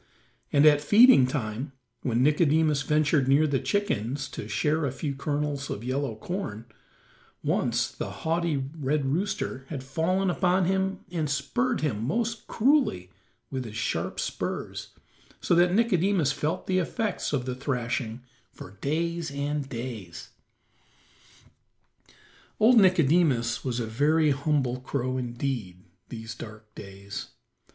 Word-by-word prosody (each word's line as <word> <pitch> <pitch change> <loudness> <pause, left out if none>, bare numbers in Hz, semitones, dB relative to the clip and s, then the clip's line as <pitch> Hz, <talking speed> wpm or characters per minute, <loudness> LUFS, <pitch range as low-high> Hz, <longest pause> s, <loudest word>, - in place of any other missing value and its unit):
And 145 +1 +5
at 145 -1 +6
feeding 205 - +7
time, 130 +1 -3 0.3
when 120 0 +1
Nicodemus 150 0 +3
ventured 150 -1 +2
near 140 +3 +5
the 140 -3 +1
chickens 140 - -1
to 105 - -7
share 150 +10 0
a - - -2
few 140 +2 -3
kernels 145 0 -2
of 105 - -4
yellow 130 -1 -2
corn, 115 - -5 0.8
once - - 0
the - - -5
haughty 165 -1 -1 0.2
red 145 -1 0
rooster 140 -3 -2
had 140 -4 -5
fallen 180 +8 0
upon 180 +1 +2
him 190 +1 0
and 160 -4 -1
spurred 235 - 0
him 115 -8 -1
most 225 - -2
cruelly 235 - +2 0.4
with 130 -1 -2
his 110 -3 -9
sharp - - -2
spurs, - - -4 0.5
so - - +1
that 175 +1 +5
Nicodemus 190 - +2
felt 155 +6 -2
the 185 0 +1
effects 210 +3 -2
of 135 -4 -1
the 130 - -2
thrashing 125 -3 -3 0.3
for 95 +2 -12
days 170 +2 -1
and 140 0 -3
days. 115 -8 -7 2.3
Old 230 +2 +7
Nicodemus 160 - +3
was 125 -2 -2
a 115 - -1
very 150 +7 +2
humble 135 -3 0
crow 130 0 -2
indeed 120 -7 -4 0.3
these 115 -1 -7
dark 110 -1 -11
days. 100 -1 -8
145 Hz, 130 wpm, -27 LUFS, 125-170 Hz, 2.3 s, feeding